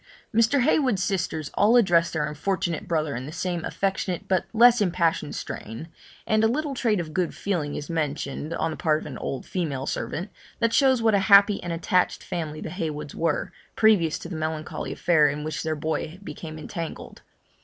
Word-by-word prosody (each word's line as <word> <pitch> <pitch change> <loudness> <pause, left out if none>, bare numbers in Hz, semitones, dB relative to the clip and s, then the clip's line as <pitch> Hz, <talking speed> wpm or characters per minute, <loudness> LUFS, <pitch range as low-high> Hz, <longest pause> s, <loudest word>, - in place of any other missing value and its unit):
Mr. 230 +5 +3
Heywood's 255 -9 +2
sisters 170 -6 -2
all 215 +4 +4
address 175 -7 +4
their 155 -2 -1
unfortunate 165 +2 -2
brother 155 -4 0
in 125 +3 -5
the - - -6
same 175 0 -3
affectionate, 190 -2 -2
but 185 -2 +1
less 235 +1 +6
impassioned 175 -3 0
strain; 115 +10 -6 0.4
and 215 0 +2
a - - +6
little 285 +4 -1
trait 225 -6 +1
of 160 -3 -5
good 180 0 -1
feeling 165 -8 -2
is 145 - -5
mentioned, 150 -2 -3
on 160 - -1
the - - -6
part 155 -3 +2
of - - -10
an 135 -5 -7
old 135 - -4
female 145 -8 -3
servant, 185 +8 -3 0.3
that 230 -1 +1
shows 260 -4 +4
what 220 -1 +4
a 200 - +4
happy 200 0 +7
and 175 - -4
attached 170 +2 +1
family 155 -3 -4
the - - -5
Heywoods 150 -5 -4
were, 165 -2 -1 0.2
previous 195 -8 +4
to - - -8
the 170 - -6
melancholy 155 0 -4
affair 155 -4 +3
in 145 +1 -2
which 155 -3 -3
their 160 0 -1
boy 155 +2 -3
became 155 -1 -7
entangled. 165 +1 -7
170 Hz, 185 wpm, -25 LUFS, 155-200 Hz, 0.4 s, happy